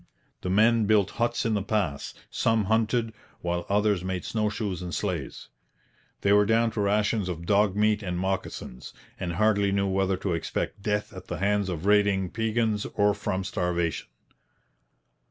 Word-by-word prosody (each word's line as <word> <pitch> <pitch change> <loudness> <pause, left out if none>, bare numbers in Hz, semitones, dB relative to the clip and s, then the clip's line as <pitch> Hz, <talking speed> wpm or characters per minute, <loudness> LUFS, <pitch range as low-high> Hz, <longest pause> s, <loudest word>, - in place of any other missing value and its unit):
The 90 - -3
men 110 +3 +4
built 105 -3 +3
huts 120 0 +1
in 115 - +1
the 105 - +1
pass; 95 -8 -2 0.2
some 115 -1 +2
hunted, 110 +2 +1 0.3
while 85 0 -2
others 105 -2 +2
made 95 -1 -3
snow 105 -2 0
shoes 100 -4 -3
and 90 -1 -4
sleighs. 90 -9 -4 0.7
They 100 - +3
were 105 0 +5
down 115 +1 +3
to 105 - -2
rations 105 -1 +1
of 85 -1 -5
dog 100 0 +3
meat 105 0 +2
and 90 -3 -3
moccasins, 95 -9 -4 0.2
and 90 -2 -3
hardly 100 +1 +2
knew 100 0 +1
whether 95 0 +1
to 90 -1 -2
expect 85 +4 -3
death 105 +1 -1
at 95 - -10
the 85 - -4
hands 100 +1 +1
of 85 0 -4
raiding 100 -3 +3
Piegans 110 -1 0
or 105 0 +3
from 95 -2 -2
starvation. 85 -3 -1
100 Hz, 165 wpm, -27 LUFS, 95-105 Hz, 0.7 s, were